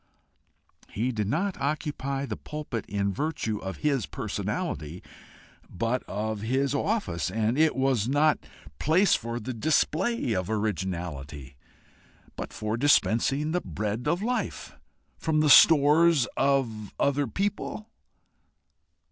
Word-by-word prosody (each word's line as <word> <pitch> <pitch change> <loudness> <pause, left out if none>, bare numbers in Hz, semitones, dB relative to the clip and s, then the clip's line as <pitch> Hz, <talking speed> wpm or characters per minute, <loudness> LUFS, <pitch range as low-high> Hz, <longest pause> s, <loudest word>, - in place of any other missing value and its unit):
He 120 +5 -1
did 105 -4 -2
not 180 - -1
occupy 140 -2 -2
the - - -4
pulpit 150 -7 -6
in 100 -1 -1
virtue 115 - -2
of 95 0 -6
his 140 -7 +1
personality, 75 +5 -4 0.7
but 115 +7 -1
of 105 +1 -3
his 130 +5 0
office, 145 - -1
and 110 +4 0
it 155 +1 +3
was 130 -5 +1
not 145 +3 +3 0.3
a - - -13
place 175 +6 +4
for 115 +1 -2
the 125 +3 -5
display 155 - +1
of 90 0 -2
originality, 85 - -4 0.8
but - - -6
for 110 +1 -3
dispensing 140 +2 +2
the 180 +1 0
bread 105 - -4
of 175 +6 0
life. 245 +2 -3 0.4
From 160 -1 +1
the 150 -2 +4
stores 155 -1 +6
of 120 -7 0
other 140 0 +1
people? 205 - -3
130 Hz, 120 wpm, -27 LUFS, 105-150 Hz, 0.8 s, stores